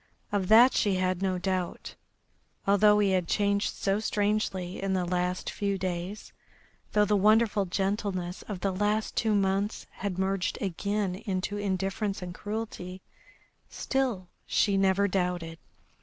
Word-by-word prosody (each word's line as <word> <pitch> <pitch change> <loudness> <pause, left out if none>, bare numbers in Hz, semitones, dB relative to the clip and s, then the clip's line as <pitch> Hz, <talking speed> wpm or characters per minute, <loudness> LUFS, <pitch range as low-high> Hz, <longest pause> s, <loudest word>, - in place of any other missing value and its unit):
Of 200 -3 0
that 235 +5 +7
she 200 -3 +2
had 185 0 0
no 190 -1 0
doubt. 185 -1 -3 0.7
Although 210 +1 +5
he 205 -2 +3
had 185 -2 +1
changed 200 +1 +1
so 195 +1 0
strangely 205 -4 -1
in 195 0 -1
the 185 -1 0
last 180 +1 -1
few 200 -1 -1
days, 185 +2 -4 0.6
though 210 0 +4
the 210 - +2
wonderful 210 0 +4
gentleness 190 -1 -2
of 195 -4 -5
the 195 - +1
last 210 +3 0
two 220 -2 +2
months 195 +1 0
had 195 -2 -4
merged 190 -1 -1
again 200 +1 -1
into 195 0 -3
indifference 195 0 -2
and 175 -1 -6
cruelty, 205 -3 -6 0.7
still 250 -9 -1 0.2
she 200 -2 +2
never 195 +1 +3
doubted. 180 -3 -2
195 Hz, 140 wpm, -28 LUFS, 185-210 Hz, 0.7 s, that